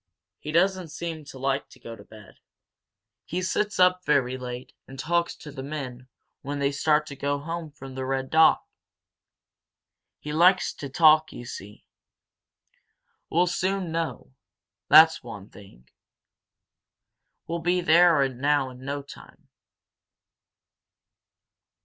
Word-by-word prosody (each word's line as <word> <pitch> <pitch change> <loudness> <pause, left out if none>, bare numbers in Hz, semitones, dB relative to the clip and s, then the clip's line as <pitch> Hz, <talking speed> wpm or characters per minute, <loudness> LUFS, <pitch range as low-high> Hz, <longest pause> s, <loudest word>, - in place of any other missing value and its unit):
He 150 - -6
doesn't 185 +2 +1
seem 160 -1 -6
to 140 - -11
like 135 +1 -2
to 130 - -18
go 115 -1 -9
to - - -14
bed. 105 -3 -16 0.8
He 180 +2 -4
sits 210 +2 -1
up 180 0 +4
very 135 -5 +1
late, 125 -1 -7
and 135 - -11
talks 170 +4 -1
to 150 - -11
the 135 -1 -8
men 130 -3 -7 0.3
when 145 +1 -5
they 140 0 0
start 150 +1 +1
to 140 - -9
go 140 +1 -2
home 165 +2 -6
from 135 -2 -11
the 130 0 -5
Red 130 0 -3
Dog. 160 0 +6 1.6
He 150 - -7
likes 180 +4 +4
to 140 - -8
talk, 155 +2 +5
you 120 - -9
see. 105 -2 -10 1.4
We'll 175 +2 +3
soon 185 0 -2
know 160 -5 -4 0.6
that's 160 +1 +7
one 110 -4 -10
thing. 65 - -16 1.6
We'll 170 +1 -3
be 175 +2 +1
there 170 -4 +5
now 135 +1 0
in 125 +1 -13
no 140 +1 -4
time." 140 - -15
145 Hz, 130 wpm, -25 LUFS, 130-170 Hz, 1.6 s, that's